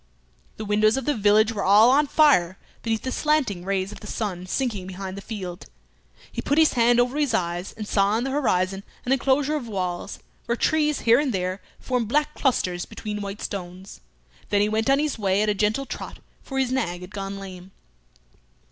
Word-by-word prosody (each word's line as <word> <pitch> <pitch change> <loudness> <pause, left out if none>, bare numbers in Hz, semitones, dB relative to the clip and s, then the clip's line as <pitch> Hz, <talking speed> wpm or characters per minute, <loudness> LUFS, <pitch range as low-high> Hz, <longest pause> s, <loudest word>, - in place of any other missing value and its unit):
The 215 - -5
windows 215 +3 +3
of 270 - -3
the 295 - +2
village 215 0 +4
were 205 - -3
all 210 +5 +6
on 290 +2 +4
fire 255 - +4 0.2
beneath 225 -1 -2
the 260 - -3
slanting 275 - 0
rays 195 0 -1
of - - -10
the 210 - -10
sun 185 -5 -4
sinking 210 -4 -2
behind 190 0 -6
the 200 - -7
field. 190 -5 -7 0.6
He - - -4
put 285 - 0
his 320 -1 +5
hand 240 0 +4
over 250 +4 +1
his 280 -7 +1
eyes, 175 -1 -2
and 215 -2 -7
saw 200 +1 +2
in 235 - -1
the 270 - -2
horizon 195 -8 0 0.2
an 250 - -1
enclosure 270 +3 +2
of 270 -6 -4
walls, 185 -4 -3 0.3
where 235 - +1
trees 300 +3 +1
here 230 +2 +5
and 290 -3 0
there 185 -1 -2 0.2
formed 250 -3 -1
black 300 +5 +1
clusters 180 -12 0
between 210 -1 -6
white 200 +1 -6
stones; 185 0 -7 0.5
then 205 - +2
he 210 - +2
went 220 +4 0
on 275 - +5
his 295 -4 -1
way 200 0 +2
at 215 - +1
a - - +3
gentle 210 +6 0
trot, - - -7 0.2
for 270 - -6
his 260 -2 +1
nag 180 -9 -1
had 180 +1 -10
gone 195 -1 -5
lame. 190 -2 -9
215 Hz, 200 wpm, -24 LUFS, 195-260 Hz, 0.6 s, all